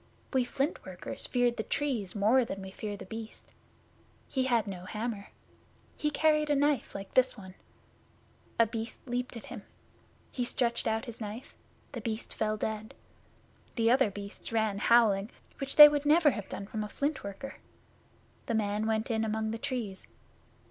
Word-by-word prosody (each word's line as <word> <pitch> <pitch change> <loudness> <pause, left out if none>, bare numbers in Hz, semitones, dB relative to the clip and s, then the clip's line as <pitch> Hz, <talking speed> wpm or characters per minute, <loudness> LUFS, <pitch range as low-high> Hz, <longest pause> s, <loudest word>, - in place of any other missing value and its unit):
We 260 -2 +3
Flint 275 +5 -2
workers - - -4
fear 245 -1 +2
the 235 - -3
Trees 235 -5 -2
more 220 +6 +4
than 195 -4 -5
we 190 - -8
fear 205 +1 -5
The - - -9
Beast. 220 +3 -9 0.7
He 260 -2 0
had 235 -4 +2
no 185 -3 -6
hammer. 215 0 -4 0.7
He 300 - 0
carried 305 0 +2
a 295 - +4
knife 285 -3 +1
like 195 0 -7
this 255 -1 +3
one. 190 -2 -10 1.0
A 230 - +6
Beast 225 0 -5
leaped 245 -1 -3
at 230 - -9
him. - - -8 0.7
He 250 - -2
stretched 240 -1 0
out 220 0 0
his 235 -2 -9
knife. 215 +4 -6 0.4
The 245 -5 -5
Beast 220 0 -4
fell 215 0 -1
dead. 215 0 -4 0.8
The 230 -1 +3
other 260 -3 +4
Beasts 200 +2 -8
ran 220 -3 +1
away - - -3
howling, 220 -4 +5 0.3
which 275 0 -4
they 295 -1 +13
would 290 0 0
never 310 0 +6
have 210 -5 -6
done 200 - -5
from 215 +1 -4
a 210 - -6
Flint 285 +5 -2
worker. 200 +7 -7 0.9
The 230 - 0
man 210 0 0
went 220 +1 0
in 220 -1 +1
among 220 0 -1
the 225 - -4
Trees. 240 -8 -4
225 Hz, 175 wpm, -30 LUFS, 210-260 Hz, 1.0 s, they